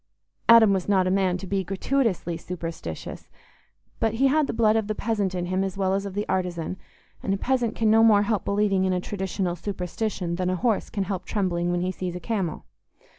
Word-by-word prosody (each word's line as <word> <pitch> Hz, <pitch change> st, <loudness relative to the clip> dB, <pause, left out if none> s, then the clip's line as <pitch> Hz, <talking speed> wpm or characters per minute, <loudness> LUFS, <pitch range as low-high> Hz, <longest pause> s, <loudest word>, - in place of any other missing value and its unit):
Adam 225 Hz, -3 st, +8 dB
was 190 Hz, 0 st, -2 dB
not 190 Hz, -2 st, +3 dB
a 185 Hz, -, +1 dB
man 190 Hz, -2 st, +2 dB
to 185 Hz, -, -8 dB
be 195 Hz, 0 st, -1 dB
gratuitously 195 Hz, -, -1 dB
superstitious, 165 Hz, -, -7 dB, 0.7 s
but 225 Hz, 0 st, +1 dB
he 265 Hz, +4 st, +2 dB
had 300 Hz, +1 st, +2 dB
the -, -, -1 dB
blood 220 Hz, -1 st, +3 dB
of 220 Hz, -2 st, 0 dB
the 215 Hz, -, -2 dB
peasant 205 Hz, -4 st, -1 dB
in 175 Hz, -1 st, -2 dB
him 185 Hz, +2 st, 0 dB
as 195 Hz, -1 st, -4 dB
well 190 Hz, -1 st, +1 dB
as 200 Hz, +1 st, -1 dB
of 195 Hz, -, -8 dB
the 205 Hz, +1 st, -2 dB
artisan, 180 Hz, -2 st, -2 dB, 0.5 s
and 195 Hz, -, 0 dB
a -, -, -3 dB
peasant 245 Hz, +1 st, 0 dB
can 220 Hz, -1 st, +2 dB
no 225 Hz, +1 st, +6 dB
more 210 Hz, -2 st, +6 dB
help 210 Hz, -1 st, 0 dB
believing 200 Hz, -2 st, +1 dB
in 190 Hz, -1 st, +1 dB
a 180 Hz, -, +1 dB
traditional 190 Hz, -1 st, -3 dB
superstition 180 Hz, -1 st, -3 dB
than 180 Hz, 0 st, 0 dB
a 185 Hz, -, +1 dB
horse 220 Hz, +4 st, 0 dB
can 200 Hz, -, -2 dB
help 190 Hz, -1 st, -4 dB
trembling 175 Hz, -4 st, -1 dB
when 175 Hz, 0 st, 0 dB
he 185 Hz, +1 st, 0 dB
sees 180 Hz, -1 st, -5 dB
a -, -, -4 dB
camel. 185 Hz, -3 st, -3 dB
195 Hz, 220 wpm, -25 LUFS, 180-215 Hz, 0.7 s, Adam